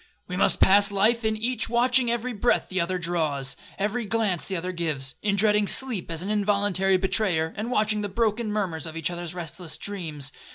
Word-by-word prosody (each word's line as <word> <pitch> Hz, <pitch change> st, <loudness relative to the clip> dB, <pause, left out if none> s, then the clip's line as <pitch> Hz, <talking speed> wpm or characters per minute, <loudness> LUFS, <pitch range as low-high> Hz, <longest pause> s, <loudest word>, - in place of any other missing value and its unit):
We 180 Hz, -, -5 dB
must 185 Hz, -, +3 dB
pass 200 Hz, +2 st, +6 dB
life 215 Hz, +4 st, +2 dB
in 220 Hz, 0 st, 0 dB
each 230 Hz, +1 st, -2 dB
watching 245 Hz, +1 st, +3 dB
every 240 Hz, +1 st, -1 dB
breath 230 Hz, +3 st, +1 dB
the 185 Hz, -1 st, 0 dB
other 185 Hz, +2 st, -1 dB
draws, 155 Hz, -6 st, -1 dB, 0.2 s
every 215 Hz, +4 st, -1 dB
glance 210 Hz, -5 st, -1 dB
the 195 Hz, -, -3 dB
other 180 Hz, +2 st, -3 dB
gives,—in 165 Hz, +3 st, -2 dB
dreading 210 Hz, 0 st, +3 dB
sleep 240 Hz, -9 st, 0 dB
as 165 Hz, +1 st, -3 dB
an 200 Hz, -, -3 dB
involuntary 200 Hz, -2 st, +2 dB
betrayer, 180 Hz, -4 st, 0 dB
and 215 Hz, +3 st, -4 dB
watching 215 Hz, -3 st, +1 dB
the 205 Hz, -, -3 dB
broken 220 Hz, +1 st, 0 dB
murmurs 180 Hz, -7 st, -2 dB
of 160 Hz, 0 st, -7 dB
each 165 Hz, +1 st, -1 dB
other's 175 Hz, 0 st, -6 dB
restless 170 Hz, -1 st, -6 dB
dreams. 155 Hz, -9 st, -4 dB
200 Hz, 190 wpm, -25 LUFS, 170-215 Hz, 0.2 s, pass